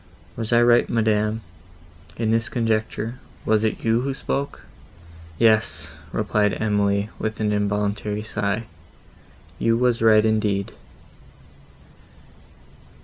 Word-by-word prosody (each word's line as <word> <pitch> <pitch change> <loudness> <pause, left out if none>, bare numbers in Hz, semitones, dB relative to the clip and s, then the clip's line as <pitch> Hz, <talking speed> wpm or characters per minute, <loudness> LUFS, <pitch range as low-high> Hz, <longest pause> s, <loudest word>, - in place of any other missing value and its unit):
Was 115 0 -4
I 120 0 +5
right, 120 0 +4
madam, 110 -1 +1 0.8
in 110 -1 0
this 115 +1 +2
conjecture—was 110 -1 -2
it 110 - -1
you 115 +1 +3
who 135 +1 -2
spoke?" 140 +1 -3 0.8
"Yes," 110 -9 +2 0.2
said 105 0 0
Emily, 100 -1 +1
with 110 0 -3
an 105 -1 +1
involuntary 105 0 -1
sigh, 105 +1 -2 1.0
"you 115 0 +2
were 125 0 +3
right 110 -1 +5
indeed." 105 -3 0
110 Hz, 100 wpm, -23 LUFS, 105-115 Hz, 1.0 s, I